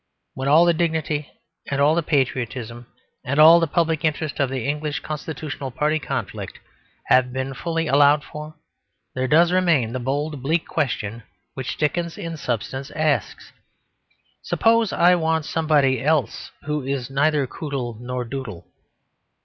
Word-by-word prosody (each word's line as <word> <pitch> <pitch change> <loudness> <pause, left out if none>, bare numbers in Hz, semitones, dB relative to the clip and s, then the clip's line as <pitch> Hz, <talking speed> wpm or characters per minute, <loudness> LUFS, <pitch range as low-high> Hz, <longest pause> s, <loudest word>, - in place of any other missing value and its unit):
When 130 +1 -4
all 155 +4 +6
the 170 - +4
dignity 160 -3 -1 0.4
and 140 - -1
all 145 +2 +4
the 170 - +1
patriotism 125 -5 -2 0.4
and 140 +3 -1
all 165 +2 +9
the 165 - +1
public 160 0 0
interest 155 -1 -1
of 140 -2 +2
the 130 -2 -3
English 150 +1 -2
constitutional 150 -2 -5
party 150 +4 0
conflict 135 -8 -5 0.5
have 125 -1 +3
been 130 +1 -3
fully 165 +4 -2
allowed 145 0 +4
for, 150 +1 -9 0.6
there 130 0 -1
does 170 +5 +4
remain 165 -11 +2
the 130 - -2
bold, 145 +3 -2
bleak 160 +5 0
question 115 -7 -2 0.3
which 130 -1 -5
Dickens 170 +2 -1
in 165 -1 -5
substance 130 0 -4
asks, 155 -2 -1 0.9
"Suppose 225 -2 +2
I 175 +1 +4
want 160 -2 0
somebody 150 -6 +2
else 155 -1 0
who 150 0 -2
is 135 -1 -3
neither 145 +1 +2
Coodle 130 -5 -5
nor 125 0 -4
Doodle." 115 -8 -7
145 Hz, 145 wpm, -22 LUFS, 130-160 Hz, 0.9 s, all